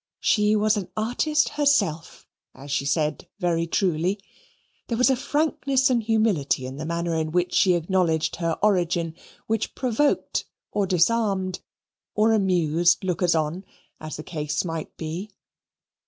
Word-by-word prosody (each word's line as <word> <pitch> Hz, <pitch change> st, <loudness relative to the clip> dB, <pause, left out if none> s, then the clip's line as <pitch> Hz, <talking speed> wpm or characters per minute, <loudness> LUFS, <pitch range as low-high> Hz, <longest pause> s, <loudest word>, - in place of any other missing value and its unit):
She 210 Hz, -1 st, +3 dB
was 215 Hz, 0 st, +2 dB
an 195 Hz, -4 st, -4 dB
artist 270 Hz, +8 st, +1 dB
herself, 210 Hz, -, 0 dB, 0.3 s
as 140 Hz, +2 st, -10 dB
she 140 Hz, -, 0 dB
said 150 Hz, +2 st, -1 dB
very 170 Hz, -2 st, 0 dB
truly; 180 Hz, +2 st, 0 dB, 0.7 s
there 230 Hz, -, -2 dB
was 255 Hz, +3 st, +4 dB
a -, -, +3 dB
frankness 275 Hz, -1 st, +1 dB
and 240 Hz, -2 st, +2 dB
humility 215 Hz, -, +1 dB
in 130 Hz, +1 st, -7 dB
the 155 Hz, +2 st, -5 dB
manner 170 Hz, 0 st, -2 dB
in 160 Hz, -1 st, -1 dB
which 180 Hz, +1 st, 0 dB
she 185 Hz, -2 st, +4 dB
acknowledged 170 Hz, -2 st, 0 dB
her 165 Hz, -1 st, -1 dB
origin, 175 Hz, -5 st, +1 dB, 0.3 s
which 220 Hz, -1 st, -2 dB
provoked, 260 Hz, +3 st, 0 dB, 0.3 s
or 205 Hz, -2 st, 0 dB
disarmed, 190 Hz, 0 st, +1 dB, 0.6 s
or 220 Hz, +1 st, +3 dB
amused 175 Hz, -3 st, +2 dB
lookers 180 Hz, -2 st, +1 dB
on, 160 Hz, +4 st, -1 dB, 0.4 s
as 155 Hz, 0 st, -7 dB
the 155 Hz, -, -7 dB
case 150 Hz, 0 st, -3 dB
might 165 Hz, -2 st, -5 dB
be. 170 Hz, +6 st, -5 dB
180 Hz, 140 wpm, -24 LUFS, 165-215 Hz, 0.7 s, was